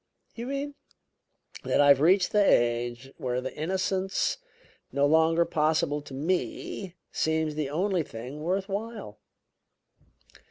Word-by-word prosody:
"You 235 +1 -6
mean 280 +1 -3 0.4
?" - - -19
"That - - +1
I 145 0 +6
have 140 -1 +6
reached 180 +4 +4
the 210 -1 +4
age 120 -2 +1
where 125 -1 -2
the 130 +1 -6
innocence 190 +3 -1 0.5
no 140 +2 +2
longer 160 +3 +4
possible 155 -1 +1
to 140 -2 -10
me 180 +4 -3 0.2
seems 160 -1 0
the 150 -2 -2
only 180 +4 0
thing 125 +1 -7
worth 190 +4 -1
while." 205 - -5
160 Hz, 130 wpm, -28 LUFS, 140-190 Hz, 0.5 s, I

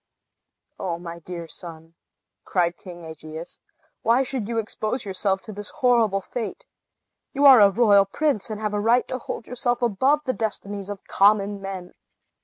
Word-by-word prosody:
"O 175 -3 -2
my 170 0 -8
dear 170 0 -7
son," 165 -1 -10 0.5
cried 175 -2 0
King 175 -2 -11
Aegeus, 160 +1 -9 0.4
"why 235 +4 +3
should 255 -5 -4
you 230 0 -3
expose 225 +2 -2
yourself 190 0 -1
to 215 - -9
this 205 +1 -5
horrible 235 -8 +2
fate? 245 - -6 0.7
You 280 +1 +2
are 265 -4 +10
a 200 -1 +8
royal 205 -2 +5
prince, 270 +1 0
and 215 -1 -4
have 210 -1 -2
a 205 - 0
right 235 +4 +3
to 255 - -3
hold 230 - -6
yourself 245 -1 -1
above 260 +7 +2
the 255 - 0
destinies 205 -3 -4
of 205 -2 -7
common 200 0 +3
men." 190 -2 -7
205 Hz, 165 wpm, -24 LUFS, 185-240 Hz, 0.7 s, are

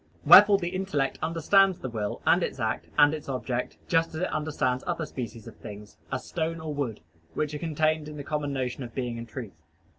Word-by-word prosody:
Wherefore 205 -1 +9
the 175 -3 -3
intellect 185 -8 -1
understands 170 +4 +3
the - - -6
will, 110 -4 -4
and - - +4
its - - -3
act, - - -2
and 145 0 +6
its 150 -2 -6
object, 125 -2 -3
just 165 -1 +1
as 160 - -3
it 185 - -1
understands 150 -4 -1
other 170 -2 -1
species 115 -5 -7
of - - -11
things, 105 -1 -10 0.2
as 135 -1 -3
stone 165 0 -3
or 160 -1 -5
wood, 135 -7 -3 0.3
which 150 -1 -1
are 150 - -4
contained 155 -1 0
in 150 - -9
the 145 - -6
common 150 0 -2
notion 130 -1 -3
of 120 -1 -9
being 120 -3 -3
and 115 0 -8
truth. 105 -12 -8
145 Hz, 210 wpm, -27 LUFS, 125-160 Hz, 0.3 s, Wherefore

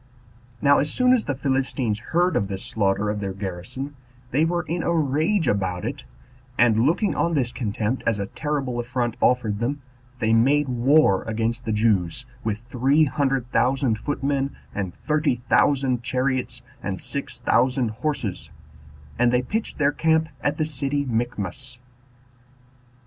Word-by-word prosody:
Now 145 0 +6
as 150 - 0
soon 250 0 +4
as 240 -4 +2
the 145 - -1
Philistines 130 -5 -1
heard 175 +8 +1
of 100 - +1
this 95 -1 -5
slaughter 100 0 0
of 105 - -3
their 100 -2 -3
garrison, 100 +9 -6 0.4
they 150 +5 +3
were 175 +1 0
in 170 +1 -2
a 170 - 0
rage 160 +4 +1
about 95 -3 0
it, - - -5 0.5
and, 115 -2 +4
looking 190 +7 +2
on 170 -1 +1
this 125 -4 0
contempt 110 +1 -2
as 115 - +2
a 100 - -2
terrible 135 0 -3
affront 120 -1 -2
offered 110 -5 +2
them, 135 +4 -2 0.3
they 110 -2 +1
made 140 +6 +4
war 125 -4 +4
against 115 +2 -2
the 110 - -1
Jews, 105 0 +1 0.2
with 110 0 -2
three 135 +5 +3
hundred 135 -3 -1
thousand 130 -3 +2
footmen, 140 +1 -1 0.2
and 95 -3 -3
thirty 150 -3 0
thousand 130 -4 +3
chariots, 130 +1 -1 0.2
and 95 -1 -3
six 135 +1 -5
thousand 125 0 +2
horses; 115 -4 -3 0.7
and 120 -1 +4
they 125 0 +2
pitched 220 - -3
their 145 -2 +3
camp 160 +1 +2
at 145 - 0
the 155 - +1
city 145 -1 -2
Michmash. 120 0 -3
125 Hz, 155 wpm, -24 LUFS, 110-145 Hz, 0.7 s, Now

